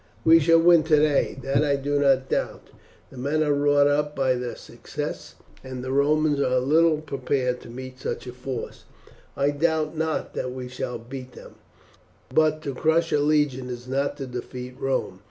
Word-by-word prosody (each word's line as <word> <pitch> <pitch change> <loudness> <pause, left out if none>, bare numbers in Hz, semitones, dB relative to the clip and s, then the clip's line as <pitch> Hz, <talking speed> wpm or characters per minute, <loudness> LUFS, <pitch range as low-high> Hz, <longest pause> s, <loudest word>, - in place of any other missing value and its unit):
We 165 +1 +7
shall 165 +2 +5
win 170 0 +6
today, 150 -3 +2
that 140 +2 +1
I 145 -2 +2
do 145 +1 -1
not 135 -2 +3
doubt. - - -3 0.4
The 130 - -10
men 150 +4 0
are 150 -1 +2
wrought 145 0 +3
up 150 +1 +1
by 135 -1 +2
their 125 -1 -4
success, - - -7 0.3
and 130 -1 -7
the 130 - -4
Romans 145 +1 +2
are 130 -2 +2
little 155 +4 +3
prepared 130 -3 -2
to - - -12
meet 130 +1 -9
such - - -4
a 125 - -7
force 125 -1 -6 0.5
I 140 +1 +2
doubt 155 +1 0
not 160 0 -2
that 125 - -3
we 125 -1 -6
shall 125 -1 -4
beat 125 +2 -9
them, - - -13 0.8
but 155 +1 +2
to 140 - -3
crush 160 +4 +1
a 150 - +3
legion 145 -4 +1
is 120 0 -7
not 140 +2 -1
to 135 - -5
defeat 125 0 -7
Rome. 130 -8 -2
140 Hz, 180 wpm, -24 LUFS, 130-150 Hz, 0.8 s, We